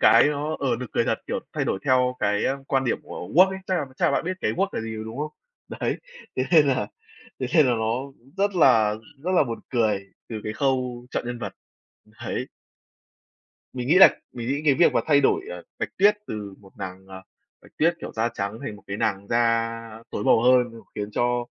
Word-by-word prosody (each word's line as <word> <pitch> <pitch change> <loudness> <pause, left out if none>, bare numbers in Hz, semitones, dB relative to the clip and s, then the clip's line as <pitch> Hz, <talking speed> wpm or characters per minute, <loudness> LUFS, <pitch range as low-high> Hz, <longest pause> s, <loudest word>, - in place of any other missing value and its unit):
cái 115 - +7
nó, 150 +1 -2
ờ, 130 -4 0
nực 125 - -6
cười - - +2
thật, - - 0
kiểu, - - -2
thay - - -1
đổi 95 - -1
theo 125 -1 +3
cái 105 0 +1 0.2
quan 135 -1 +1
điểm 120 - 0
của 90 - -8
Walt 185 +3 +7
ấy. 190 - -5
Chắc 185 - 0
là 145 - -1
chắc - - 0
là - - +3
bạn - - 0
biết 185 - -1
cái - - 0
Walt 195 +2 0
là - - -2
gì 110 0 -5
rồi, 110 - -5
đúng 110 +4 -7
không? 150 0 -3 0.4
Đấy, - - -2 0.4
thế 130 - +1
nên 150 -4 +7
là 125 -6 +1 0.5
thế 130 - 0
nên 155 -4 +6
là 125 - +3
nó 110 0 0 0.4
rất 200 0 +1
là 115 -10 +5 0.3
rất 185 - 0
là - - +5
buồn 115 -3 -5
cười 105 -5 +1 0.2
từ 110 -2 -5
cái 105 - -3
khâu 125 -1 -1
chọn - - -2
nhân 120 0 -4
vật. 100 -5 -5 0.5
Đấy. - - -5 1.3
Mình 125 -1 -4
nghĩ 165 - +4
là 190 - +10 0.2
mình 120 -2 -5
nghĩ 140 +3 -1
cái 140 - +6
việc 170 - +4
mà - - +3
thay 145 -2 +4
đổi, 265 - +3
ờ, - - -7 0.2
Bạch - - -2
Tuyết 205 +2 +5
từ 105 -2 -5
một 95 -2 -17
nàng, 95 0 -7
à, 95 0 -10 0.4
Bạch - - -19
Tuyết, 170 +2 +3
kiểu, - - -7
da 115 +1 0
trắng 100 +2 -3
thành 105 - -5
một 105 - -16
cái 100 - -4
nàng 100 -1 -1
da 115 -1 +2 0.4
tối 105 - -3
màu - - +5
hơn 125 0 +5 0.3
khiến 105 0 -4
cho, 120 +1 0
120 Hz, 230 wpm, -24 LUFS, 110-145 Hz, 1.3 s, là